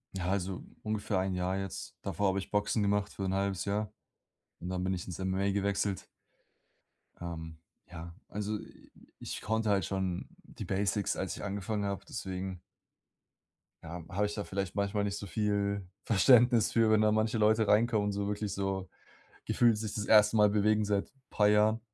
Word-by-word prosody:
Ja, 90 Hz, -2 st, -2 dB
also 95 Hz, -1 st, -2 dB, 0.2 s
ungefähr 105 Hz, -2 st, -1 dB
1 95 Hz, 0 st, -1 dB
Jahr 90 Hz, +1 st, -1 dB
jetzt. 95 Hz, -2 st, -6 dB
Davor 100 Hz, -1 st, 0 dB
habe 95 Hz, +1 st, 0 dB
ich 95 Hz, -, -7 dB
Boxen 105 Hz, +1 st, +1 dB
gemacht 100 Hz, 0 st, +1 dB
für 100 Hz, -, -5 dB
1/2 95 Hz, 0 st, -1 dB
Jahr. 105 Hz, +1 st, -1 dB, 0.7 s
Und 90 Hz, -, -6 dB
dann 90 Hz, 0 st, -2 dB
bin 95 Hz, +1 st, 0 dB
ich 90 Hz, -1 st, -4 dB
ins 90 Hz, -2 st, -6 dB
MMA 95 Hz, +1 st, 0 dB
gewechselt. 100 Hz, -1 st, -1 dB, 1.1 s
Ähm, 80 Hz, -2 st, -6 dB, 0.3 s
ja, 85 Hz, -1 st, -8 dB
also 105 Hz, +1 st, -3 dB
i -, -, -15 dB, 0.3 s
ich -, -, -6 dB
konnte 110 Hz, 0 st, 0 dB
halt 100 Hz, -2 st, +2 dB
schon 95 Hz, -2 st, -2 dB, 0.2 s
die -, -, -9 dB
Basics, 100 Hz, +1 st, 0 dB
als -, -, -3 dB
ich -, -, -8 dB
angefangen 100 Hz, +1 st, -2 dB
habe, 100 Hz, -1 st, -3 dB
deswegen 95 Hz, -1 st, -5 dB, 1.2 s
Ja, 85 Hz, +1 st, -7 dB
habe 100 Hz, +3 st, 0 dB
ich 105 Hz, -, -3 dB
da 105 Hz, -, -3 dB
vielleicht 100 Hz, -2 st, -4 dB
manchmal 100 Hz, 0 st, 0 dB
nicht 100 Hz, 0 st, -2 dB
so 100 Hz, -, -6 dB
viel 100 Hz, 0 st, -1 dB, 0.2 s
Verständnis 120 Hz, +1 st, +5 dB
für, 115 Hz, -1 st, +3 dB
wenn 110 Hz, 0 st, +5 dB
da 110 Hz, 0 st, +4 dB
manche 110 Hz, +1 st, +1 dB
Leute 110 Hz, 0 st, +3 dB
reinkommen 110 Hz, 0 st, +3 dB
und -, -, 0 dB
so 100 Hz, 0 st, -2 dB
wirklich 105 Hz, 0 st, -2 dB
so 95 Hz, -1 st, -2 dB, 0.6 s
gefühlt 120 Hz, -3 st, +3 dB
sich 110 Hz, -1 st, -4 dB
das 105 Hz, -1 st, -3 dB
1. 110 Hz, 0 st, +6 dB
Mal 105 Hz, -1 st, +6 dB
bewegen 105 Hz, +1 st, +3 dB
seit 100 Hz, -1 st, 0 dB, 0.2 s
paar 105 Hz, -1 st, +3 dB
Jahren. 105 Hz, +2 st, +4 dB
100 Hz, 180 wpm, -31 LUFS, 95-105 Hz, 1.2 s, 1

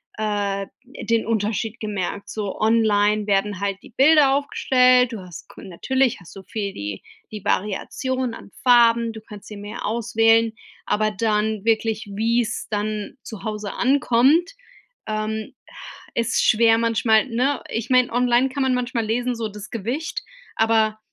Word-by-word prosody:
äh, 205 Hz, -2 st, -2 dB, 0.2 s
den 230 Hz, -3 st, -2 dB
Unterschied 220 Hz, 0 st, -2 dB
gemerkt. 200 Hz, -2 st, -4 dB
So 205 Hz, -3 st, -4 dB
online 215 Hz, -2 st, +3 dB
werden 200 Hz, -1 st, 0 dB
halt 200 Hz, -1 st, -2 dB
die -, -, -15 dB
Bilder 280 Hz, -1 st, +5 dB
aufgestellt, 255 Hz, -3 st, +3 dB
du 225 Hz, -, -6 dB
hast 180 Hz, -3 st, -11 dB
ko -, -, -13 dB
natürlich 260 Hz, +8 st, 0 dB
hast 180 Hz, -, -15 dB
du 195 Hz, -, -10 dB
viel 200 Hz, +1 st, -4 dB
die 100 Hz, -, -6 dB, 0.3 s
die 210 Hz, -2 st, -7 dB
Variation 235 Hz, +5 st, -2 dB
an -, -, -13 dB
Farben, 235 Hz, -2 st, +5 dB
du 220 Hz, -1 st, -10 dB
kannst 210 Hz, -2 st, -12 dB
sie 210 Hz, -, -9 dB
mehr 205 Hz, +1 st, -6 dB
auswählen, 225 Hz, 0 st, +2 dB, 0.3 s
aber 215 Hz, +1 st, +1 dB
dann 215 Hz, -1 st, -1 dB
wirklich, 225 Hz, -1 st, 0 dB
wie's 230 Hz, +2 st, 0 dB
dann 210 Hz, +3 st, -3 dB
zu 220 Hz, -4 st, -9 dB
Hause 210 Hz, -2 st, -4 dB
ankommt, 275 Hz, +5 st, +3 dB, 0.6 s
ähm, 215 Hz, 0 st, -3 dB
ach, -, -, -13 dB
ist 230 Hz, +1 st, 0 dB
schwer 225 Hz, 0 st, +4 dB
manchmal, 230 Hz, 0 st, +2 dB
ne? 255 Hz, +4 st, 0 dB
Ich 225 Hz, -1 st, -3 dB
meine, 255 Hz, -1 st, +3 dB
online 245 Hz, +1 st, +3 dB
kann 275 Hz, +2 st, -4 dB
man 260 Hz, -1 st, +2 dB
manchmal 245 Hz, -2 st, -2 dB
lesen, 245 Hz, +3 st, 0 dB
so 230 Hz, -2 st, -3 dB
das 210 Hz, 0 st, -10 dB
Gewicht, 245 Hz, -, -3 dB, 0.4 s
aber 220 Hz, -1 st, +2 dB
225 Hz, 150 wpm, -22 LUFS, 210-245 Hz, 0.6 s, Bilder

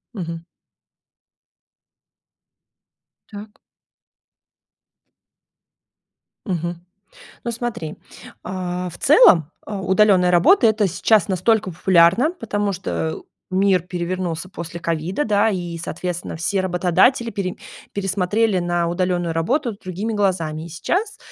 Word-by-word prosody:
Мгм. 165 Hz, -3 st, -6 dB, 2.8 s
Так. 210 Hz, 0 st, -11 dB, 2.9 s
Мгм. 170 Hz, -3 st, -3 dB, 0.6 s
Ну, 235 Hz, -, -2 dB
смотри, 230 Hz, -9 st, -5 dB, 0.5 s
а, 180 Hz, -1 st, -4 dB
в 175 Hz, -, -12 dB
целом, 180 Hz, -, +5 dB
а, 205 Hz, -2 st, -5 dB
удалённая 190 Hz, -1 st, +4 dB
работа- 260 Hz, -, +5 dB
это 215 Hz, -2 st, +2 dB
сейчас 190 Hz, +2 st, +2 dB
настолько 195 Hz, +2 st, +1 dB
популярно, 185 Hz, -, +4 dB
потому 205 Hz, -, -2 dB
что, 185 Hz, 0 st, -5 dB, 0.2 s
э, -, -, -8 dB, 0.3 s
мир 190 Hz, -1 st, +3 dB
перевернулся 180 Hz, 0 st, -4 dB
после 170 Hz, -2 st, -7 dB
ковида, 170 Hz, -, -2 dB
да, 210 Hz, +1 st, +3 dB
и, 175 Hz, -4 st, -4 dB
соответственно, 175 Hz, +1 st, -5 dB
все 190 Hz, +4 st, 0 dB
работодатели 185 Hz, +7 st, +2 dB
пере 190 Hz, -4 st, -3 dB, 0.4 s
пересмотрели 200 Hz, +1 st, 0 dB
на 175 Hz, -1 st, 0 dB
удалённую 175 Hz, -1 st, -1 dB
работу 235 Hz, -, 0 dB
другими 195 Hz, +3 st, -5 dB
глазами. 175 Hz, -7 st, -1 dB
И -, -, -9 dB
сейчас, 390 Hz, -, -2 dB
185 Hz, 100 wpm, -21 LUFS, 175-210 Hz, 2.9 s, целом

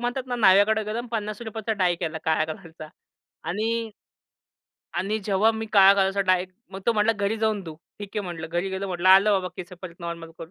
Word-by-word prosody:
म्हणतात 245 Hz, +2 st, -3 dB
ना 245 Hz, -1 st, -3 dB
न्हाव्याकडे. 215 Hz, 0 st, +5 dB
गरम 225 Hz, +3 st, -4 dB
₹50चा 220 Hz, 0 st, -3 dB
डाई 175 Hz, -1 st, +3 dB
केला 160 Hz, 0 st, -3 dB
काळ्या 160 Hz, -1 st, +2 dB
कलरचा. 160 Hz, -3 st, -11 dB, 0.6 s
आणि 225 Hz, +4 st, -2 dB, 1.1 s
आणि 210 Hz, +3 st, -1 dB
जेव्हा 205 Hz, +2 st, +3 dB
मी 220 Hz, 0 st, -4 dB
काळ्या 195 Hz, -1 st, +8 dB
कलरचा 195 Hz, 0 st, +1 dB
डाय 180 Hz, -1 st, +1 dB, 0.3 s
मग 195 Hz, 0 st, -7 dB
तो 235 Hz, -, +4 dB
म्हंटला 215 Hz, 0 st, +2 dB
घरी 205 Hz, 0 st, -1 dB
जाऊन 215 Hz, -2 st, 0 dB
धू. 160 Hz, -3 st, -8 dB, 0.2 s
ठीक 205 Hz, -1 st, -7 dB
आहे -, -, +1 dB
म्हंटलं. 170 Hz, -3 st, -6 dB
घरी 175 Hz, +3 st, -1 dB
गेलो 190 Hz, +1 st, -3 dB
म्हंटलं 180 Hz, -1 st, 0 dB
आलो 195 Hz, +3 st, +7 dB
बाबा 180 Hz, -, -4 dB
केस 180 Hz, 0 st, -8 dB
परत 175 Hz, -2 st, -8 dB
नॉर्मल 170 Hz, -1 st, -6 dB
करून. 165 Hz, -, -9 dB
200 Hz, 195 wpm, -25 LUFS, 180-220 Hz, 1.1 s, काळ्या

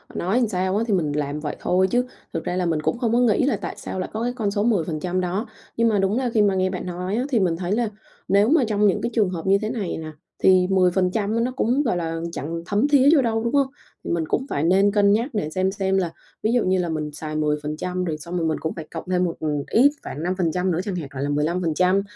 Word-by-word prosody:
nói 200 Hz, +8 st, +1 dB
sao 185 Hz, 0 st, 0 dB
á, 225 Hz, -, +1 dB
thì 210 Hz, -, +1 dB
mình 155 Hz, -6 st, +1 dB
làm 145 Hz, 0 st, -2 dB
vậy 150 Hz, -1 st, -4 dB
thôi 185 Hz, +1 st, +2 dB
chứ 245 Hz, +5 st, +1 dB, 0.3 s
thực 165 Hz, -, -3 dB
ra 180 Hz, -, -2 dB
là 185 Hz, -, 0 dB
mình 160 Hz, -3 st, 0 dB
cũng 235 Hz, -, 0 dB
không 230 Hz, -2 st, 0 dB
có 240 Hz, -, +4 dB
nghĩ 245 Hz, +1 st, +3 dB
là 245 Hz, -8 st, +1 dB
tại -, -, -6 dB
sao 185 Hz, -, -5 dB
lại 185 Hz, -, -3 dB
có 220 Hz, +2 st, -2 dB
cái 245 Hz, +1 st, -1 dB
con 210 Hz, -4 st, -1 dB
số 205 Hz, 0 st, 0 dB
10% 180 Hz, -4 st, 0 dB
đó. 185 Hz, +6 st, -2 dB, 0.3 s
Nhưng 230 Hz, 0 st, +3 dB
mà 210 Hz, -3 st, +2 dB
đúng 195 Hz, +4 st, +1 dB
là 255 Hz, -2 st, 0 dB
khi 220 Hz, -, +4 dB
mà 200 Hz, -2 st, +3 dB
nghe 185 Hz, 0 st, +1 dB
bạn 185 Hz, -1 st, -5 dB
nói 180 Hz, +2 st, -3 dB
á, 245 Hz, -, 0 dB
thì 245 Hz, -5 st, +2 dB
mình 175 Hz, -4 st, +1 dB
thấy 180 Hz, +1 st, -3 dB
là 230 Hz, +1 st, +1 dB, 0.4 s
nếu 200 Hz, +4 st, +4 dB
mà 310 Hz, -3 st, +4 dB
trong 210 Hz, -1 st, +2 dB
những 190 Hz, -, +1 dB
cái -, -, -1 dB
trường 210 Hz, -5 st, +2 dB
hợp 175 Hz, 0 st, -5 dB
như 195 Hz, +1 st, +5 dB
thế 215 Hz, -, -2 dB
này 215 Hz, -7 st, -3 dB
nè, 155 Hz, -1 st, -6 dB, 0.3 s
thì 185 Hz, -1 st, +5 dB
10% 190 Hz, +4 st, +2 dB
nó 255 Hz, -, -1 dB
cũng, 265 Hz, +4 st, +1 dB
gọi 210 Hz, -8 st, 0 dB
là, 165 Hz, -1 st, -3 dB
chẳng 165 Hz, +2 st, -4 dB
thấm 205 Hz, +10 st, +1 dB
thía 285 Hz, -1 st, +5 dB
vô 280 Hz, -, +5 dB
đâu, 225 Hz, -2 st, 0 dB
đúng 235 Hz, -, -1 dB
hông? 280 Hz, -2 st, +3 dB, 0.4 s
Thì -, -, -4 dB
mình 170 Hz, -1 st, 0 dB
cũng 265 Hz, -, 0 dB
phải 140 Hz, -, -1 dB
nên 195 Hz, +4 st, +4 dB
cân 200 Hz, -1 st, +4 dB
nhắc 230 Hz, +6 st, +1 dB
để 155 Hz, -8 st, -1 dB
xem 185 Hz, +3 st, 0 dB
xem 195 Hz, -1 st, 0 dB
là 175 Hz, -3 st, 0 dB, 0.3 s
ví 220 Hz, -, +2 dB
dụ 245 Hz, -, +3 dB
như 185 Hz, 0 st, +2 dB
là 175 Hz, -1 st, -1 dB
mình 155 Hz, -2 st, -3 dB
xài 155 Hz, +1 st, -6 dB
10% 155 Hz, +4 st, -2 dB
rồi 160 Hz, -4 st, -2 dB
xong 170 Hz, +3 st, -5 dB
rồi 165 Hz, -1 st, 0 dB
mình 155 Hz, -, 0 dB
cũng 160 Hz, -, -3 dB
phải 160 Hz, -2 st, -6 dB
cộng -, -, -5 dB
thêm 180 Hz, 0 st, +2 dB
một, 170 Hz, -, -3 dB
ừm, 150 Hz, -2 st, -1 dB
ít 265 Hz, +6 st, +5 dB
khoảng 150 Hz, +4 st, -6 dB
5% 180 Hz, 0 st, 0 dB
nữa 165 Hz, -, 0 dB
chẳng 200 Hz, -4 st, -3 dB
hạn, 150 Hz, -6 st, -5 dB
gọi 135 Hz, 0 st, -3 dB
là, 145 Hz, -, -1 dB
15%. 170 Hz, +5 st, +1 dB
185 Hz, 275 wpm, -23 LUFS, 165-215 Hz, 0.4 s, như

